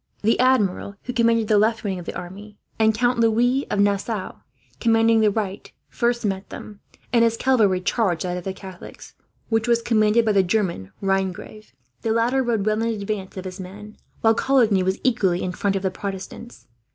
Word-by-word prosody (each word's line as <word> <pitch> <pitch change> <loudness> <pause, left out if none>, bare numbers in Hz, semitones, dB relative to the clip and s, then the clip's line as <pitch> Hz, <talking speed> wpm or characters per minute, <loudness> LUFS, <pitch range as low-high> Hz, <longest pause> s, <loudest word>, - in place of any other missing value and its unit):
The 225 +2 +2
Admiral, 215 -6 +1
who 250 - -5
commanded 230 -2 +2
the 210 -1 +4
left 225 +2 +1
wing 195 -3 -2
of 175 - -10
the - - -5
army 200 +4 -9 0.2
Count 225 +3 +2
Louis 240 +4 +2
of 205 - -1
Nassau 200 0 0 0.5
commanding 225 0 +3
the 215 - +4
right 200 -2 -4 0.2
first 240 -1 -1
met 195 -1 -3
them, 205 -1 -10 0.3
and 235 -1 +5
his 230 0 +2
cavalry 215 -9 +2
charged 180 -3 0
that 180 -1 -2
of 180 - -5
the 190 - -3
Catholics, 190 -1 -11 0.4
which 225 0 +1
was 235 -1 +2
commanded 220 0 +3
by 220 - +3
the 200 -2 +4
German 180 - -1
Rhinegrave. 195 +2 -3 0.3
The 225 - -2
latter 240 +4 +2
rode 230 -5 0
well 215 +1 +1
in 230 -2 -1
advance 200 -2 -5
of 185 - -6
his 185 +1 -7
men, 205 +3 -10 0.3
while 225 0 +5
Coligny 230 -6 +3
was 190 +1 -1
equally 195 -8 +1
in 185 - -2
front 195 +2 -1
of 195 - -2
the 190 - 0
Protestants. 195 +5 -8
215 Hz, 190 wpm, -22 LUFS, 190-230 Hz, 0.5 s, and